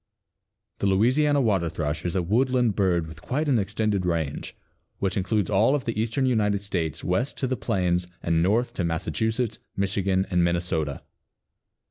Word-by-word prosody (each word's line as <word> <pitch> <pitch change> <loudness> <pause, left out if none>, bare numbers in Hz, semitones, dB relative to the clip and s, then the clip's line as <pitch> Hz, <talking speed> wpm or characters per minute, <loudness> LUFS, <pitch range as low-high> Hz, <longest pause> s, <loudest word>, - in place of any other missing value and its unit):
_) - - -44
The 100 - +1
Louisiana 130 +9 +3
Water 95 -8 +1
thrush 80 0 -3
is 90 - -1
a 90 - +1
woodland 120 +3 +2
bird 90 -5 +2
with 80 0 -11
quite 150 +5 -2
an 130 -5 +3
extended 105 0 0
range, 80 -5 -2 0.4
which 95 +1 -1
includes 100 -1 0
all 110 +8 +4
of 140 - -3
the 110 -2 -1
eastern 115 +4 0
United 105 -5 +1
States 85 -6 -2
west 115 +10 -1
to 135 - -1
the 130 0 0
plains 90 -4 0 0.2
and 85 -1 +2
north 110 +8 +1
to 90 - -2
Massachusetts, 110 +8 -1 0.2
Michigan 95 -1 +1
and 90 -1 +3
Minnesota. 85 -4 -1
100 Hz, 165 wpm, -25 LUFS, 85-115 Hz, 0.4 s, all